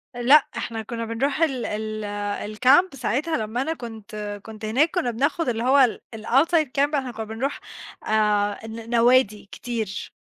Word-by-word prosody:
لأ 265 +5 +5
إحنا 230 -1 -4
كنّا 230 +1 -5
بنروح 270 +7 -1
ال 270 -7 +1
ال 210 -1 -4
الcamp 275 +9 +4
ساعتها 275 +6 -1
لمّا 220 +3 -2
أنا 320 +4 -1
كنت 215 -5 -7
كنت 220 0 -9
هناك 270 +10 +2
كنّا 245 - 0
بناخد 280 +4 0
اللي 230 -1 -2
هو 260 +3 +4
ال 250 -4 +3
الoutside 285 +8 +2
camp، 290 +2 +2
إحنا 265 -3 -2
كنّا 220 -1 -6
بنروح 225 +6 -3 0.5
آآ 210 0 +1
ن 225 +1 -8
نوادي 235 -4 +3
كتير 225 -5 -5
230 Hz, 160 wpm, -24 LUFS, 215-270 Hz, 0.5 s, لأ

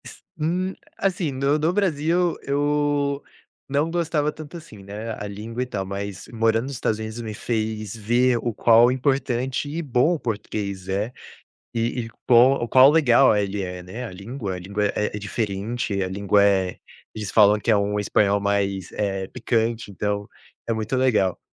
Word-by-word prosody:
S - - -10 0.2
hum. 180 +5 0 0.2
Assim, 180 -5 0
no 140 +2 +1
no 160 +3 +1
Brasil 175 -2 +1
eu 145 0 0 0.5
não 145 +4 +1
gostava 160 -3 0
tanto, 155 +2 -9
assim, 150 -12 -13
né. 105 +3 -6
A 105 - -5
língua 110 +4 -4
e - - -4
tal. 100 -6 -4
Mas 100 -1 -6
morando 115 0 +2
nos 140 +2 -5
Estados 110 -3 -1
Unidos 110 +1 -5
me 110 -2 -5
fez 110 -1 -3
ver 120 +3 +2
o 120 - -2
qual 115 +2 +5
importante 130 0 -1
e 160 +3 -3
bom 140 +2 +2
o - - -6
português 100 -4 -4
é. 105 +5 -1 0.6
E 115 +1 -1
e - - -8 0.2
quão 125 +1 +5
qual 130 +3 +7
legal 135 -6 +5
ele 100 0 -1
é, 90 -1 -5
né. 110 +8 -7
A - - -7
língua 100 0 -5
língua 100 +3 -1
é 105 +1 -1
é - - -3
diferente. 105 0 -2
A 95 - -1
língua 100 +1 +2
é 95 -2 +2 0.4
eles 105 -4 -5
falam 105 -1 +5
que 115 - 0
é 110 - +5
um 100 +1 0
espanhol 100 0 +2
mais, 100 -2 -1
eh, 95 -2 -2
picante. 115 -2 -1
Então 100 +1 -2 0.4
é - - +2
muito 110 +3 -2
legal. 110 -8 +2
115 Hz, 175 wpm, -23 LUFS, 100-135 Hz, 0.6 s, qual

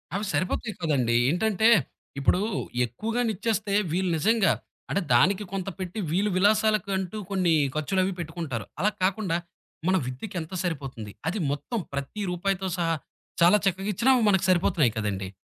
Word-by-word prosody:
అవి 205 +2 -1
సరిపోతాయి 210 +4 -1
కదండీ! 130 -8 +1
ఏంటంటే, 215 +6 +2 0.5
ఇప్పుడు 140 +6 +3 0.5
ఎక్కువగానిచ్చేస్తే, 215 - -1 0.2
వీళ్ళు 185 0 +1
నిజంగా 210 +1 +3 0.4
అంటే, 200 - +1
దానికి 190 +11 +4
కొంత 195 -1 -2
పెట్టి, 185 +3 -4
వీళ్ళు 195 +5 +2
విలాసాలకంటూ 205 -1 +2
కొన్ని 185 -3 +2 0.2
ఖర్చులు 155 +5 0
అవి 190 +1 -1
పెట్టుకుంటారు. 160 - -4
అలా 205 - +3
కాకుండా, 185 -2 +1 0.5
మన 185 - +4
విద్యకి 130 - -6
ఎంత 160 +3 -9
సరిపోతుంది, 135 - -4 0.2
అది 190 +6 -1
మొత్తం 185 - -3
ప్రతి 140 +9 -4
రూపాయితో 190 +2 -1
సహా 165 -1 +1 0.5
చాలా 175 +5 +7
చక్కగా 195 +1 0
ఇచ్చినా, 255 +8 +4 0.2
మనకు 190 -3 +3
సరిపోతున్నాయి 170 - +3
కదండీ! 100 -3 -2
185 Hz, 135 wpm, -26 LUFS, 160-205 Hz, 0.5 s, చాలా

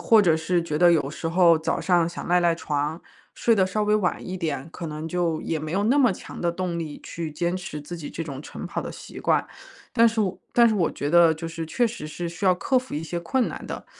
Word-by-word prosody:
或 225 -2 +6
者 170 -6 +4
是 175 +2 +1
觉 155 -2 -3
得 175 +2 +6
有 145 -5 +2
时 155 +3 -4
候 170 -1 +5
早 160 - -1
上 175 -3 +3
想 170 - -7
赖 180 +1 +3
赖 170 -1 +2
床， 150 +1 -2 0.4
睡 230 - +3
得 190 -3 +3
稍 210 +3 -1
微 210 0 +3
晚 200 -4 +1
一 185 - -4
点， 155 -5 -3
可 170 - -6
能 155 +1 -5
就 170 -2 -1
也 160 -2 -2
没 155 - -5
有 195 +4 0
那 250 +6 +3
么 255 -6 +5
强 - - -9
的 170 - +1
动 175 0 -3
力 160 -3 -5
去 165 -2 -5
坚 170 +4 -1
持 180 -5 -6
自 170 +4 -7
己 155 - -7
这 165 - -5
种 140 -2 -7
晨 - - -7
跑 - - -3
的 - - -6
习 - - -10
惯。 - - +2 0.5
但 230 -1 +6
是 225 0 -1
我 190 -3 0 0.2
但 235 -1 +6
是 220 - +1
我 180 -5 +1
觉 145 - -3
得 170 0 +6
就 160 +1 -6
是 165 0 -5
确 240 +9 +1
实 230 -6 -6
是 170 +3 -4
需 175 +4 -6
要 185 - +6
克 180 +9 0
服 255 +1 -1
一 - - -2
些 170 +1 -4
困 245 +9 +1
难 - - -6
的， - - -7
170 Hz, 285 characters per minute, -25 LUFS, 160-185 Hz, 0.5 s, 或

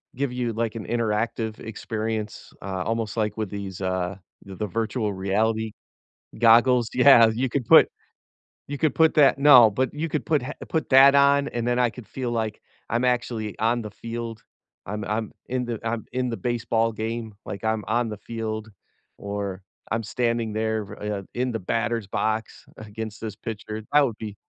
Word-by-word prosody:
give 135 0 -1
you, 125 -2 -2
like, 115 0 -2
an 110 - -5
interactive 110 -1 -1
experience, 110 -1 -5
uh, 95 -1 -3
almost 115 0 -2
like 105 -1 0
with 110 -3 -3
these, 100 -2 -6
uh, 95 0 -1 0.3
th 95 -1 -10
the 105 - -2
virtual 110 +1 -1
reality 110 +4 0 0.7
goggles 120 +1 +5
Yeah 125 -3 +7
you 130 +3 -1
could 125 -1 -2
put - - +8 0.8
you 145 - -4
could 155 0 +1
put 160 -1 +4
that 145 -3 +5
No, 135 -5 +8
but 130 +6 -1
you 155 +3 -3
could 150 - -2
put 155 -4 +2
ha 130 +4 -5 0.2
put 160 -2 -1
that 135 +1 +8
on, 140 0 +4
and 120 -1 -1
then 120 0 +1
I 125 -1 +3
could 120 -1 -12
feel 125 -3 -4
like 110 -2 -2 0.3
I'm 120 +3 +1
actually 120 -3 -1
on 115 +2 +1
the 105 -2 -7
field. 115 +1 -6 0.4
I'm 105 +2 -4
I'm 110 +1 -2 0.2
in 125 0 -1
the 115 -2 -4
I'm 115 0 -2
in 125 0 -1
the 115 - -3
baseball 115 -1 0
game, 110 0 -4
like, 100 - -7
I'm 110 -1 0
on 115 +1 +1
the 105 - -6
field, 110 -1 -4 0.5
or 100 -2 -4 0.3
I'm 115 +1 0
standing 115 +1 -1
there, 110 0 0 0.2
uh, 105 -2 -3
in 125 +1 -1
the 115 - -2
batter's 115 +2 -1
box 110 +2 -2
against 110 0 -7
this 110 -3 -5
pitcher 110 0 -6
that 145 -1 +6
would 115 -5 -4
be 105 -2 -7
115 Hz, 180 wpm, -25 LUFS, 110-120 Hz, 0.8 s, put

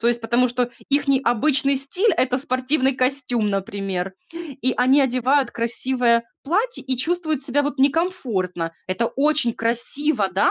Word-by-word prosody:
то 235 - +2
есть, 240 0 0
потому 235 +2 +1
что 245 0 -1 0.2
ихний 275 -1 +2
обычный 275 +3 +2
стиль- 360 +11 +2
это 255 -3 +1
спортивный 260 +1 +1
костюм, 255 -4 0
например. 195 -2 -3 0.2
И 285 -6 -3
они 260 +3 +4
одевают 260 0 +1
красивое 235 0 +1 0.2
платье 425 - -1
и 260 -1 -1
чувствуют 315 0 0
себя 285 +1 +1
вот 290 -1 -3
некомфортно. 250 - -1 0.2
Это 230 +5 0
очень 285 -3 +1
красиво, 235 0 0
да, 190 - +3
255 Hz, 145 wpm, -21 LUFS, 235-285 Hz, 0.2 s, они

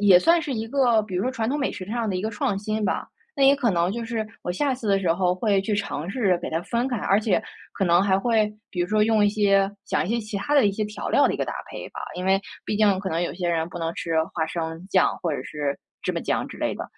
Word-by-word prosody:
也 195 -3 +7
算 335 - +4
是 295 -3 -3
一 225 0 -3
个 240 -4 +3
比 200 -3 -7
如 180 - 0
说 255 - 0
传 230 -3 -2
统 290 - 0
美 275 - 0
食 185 - -6
上 230 +2 -2
的 190 - -1
一 185 - -3
个 220 - -1
创 205 -2 -1
新 215 +1 -2
吧。 190 - -1 0.3
那 275 - +4
也 275 +1 +7
可 245 -5 +1
能 175 0 +1
就 235 0 -4
是 225 -2 -3 0.2
我 - - -3
下 270 +8 0
次 245 -3 -7
的 195 -1 +4
时 180 -4 0
候 180 0 +1
会 200 0 +1
去 210 +1 -1
尝 180 -4 -3
试 200 -6 +2
给 - - -4
它 165 +1 0
分 235 +5 -1
开， 245 - -1
而 195 - +2
且 215 0 +1 0.3
可 195 - -1
能 175 0 +4
还 190 -1 +3
会 215 -1 +2 0.2
比 180 - -3
如 175 - 0
说 215 0 +3
用 215 -1 +3
一 205 - +5
些 200 -2 +3 0.2
讲 - - 0
一 205 - -3
些 235 - 0
其 215 -1 -5
他 200 +9 -3
的 265 -7 +6
一 200 - +1
些 215 +2 -2
调 210 0 -5
料 - - +4
的 - - 0
一 - - -2
个 - - +1
搭 - - -5 0.2
配 - - -7
吧， - - -8 0.2
因 180 - -4
为 195 0 +4 0.3
毕 210 - -1
竟 205 -3 +4
可 195 - -3
能 165 +1 -1
有 - - -2
些 175 -1 -2
人 165 -1 0
不 175 - -7
能 165 0 -2
吃 165 - -4 0.2
花 160 -2 +1
生 165 +1 -4
酱 185 - +3
或 165 -3 0
者 - - -3
是 145 -2 -3 0.2
芝 - - -1
麻 - - -2
酱 - - -1
之 - - -10
类 - - -1
的。 - - -5
200 Hz, 320 characters per minute, -24 LUFS, 180-225 Hz, 0.3 s, 也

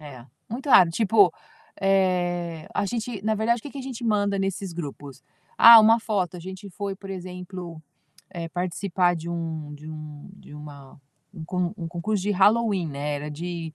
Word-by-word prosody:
É, 140 -5 -11 0.2
muito 255 +6 -6
raro. 180 -10 +7
Tipo, 205 -1 +4 0.5
eh, 175 -4 0
a - - 0
gente, 230 -1 -4
na 220 0 +1
verdade, 230 +2 +1
o - - -34
que 290 - -8
que 280 - -9
a - - -5
gente 255 -2 -7
manda 205 -3 +1
nesses 195 -1 -3
grupos? 145 -5 -8 0.3
"Ah, 230 0 +11
uma 225 +2 +5
foto". 195 -5 -2
A - - -8
gente 190 +3 -9
foi, 200 +2 -4
por 195 0 -10
exemplo, 180 -2 -7 0.5
eh, 170 -3 -6
participar 180 +1 0
de 165 +1 -7
um 160 -3 -5
de 150 +1 -11
um 155 +1 -10
de 150 - -15
uma 145 -2 -12 0.3
um 165 -5 -8
con 180 +1 -2
um 165 -4 -5
concurso 185 +4 -2
de 205 - -1
Halloween, 205 -2 +3
né, 145 +1 -3
era 150 +1 -6
de 165 +1 -6
180 Hz, 185 wpm, -25 LUFS, 165-205 Hz, 0.5 s, Ah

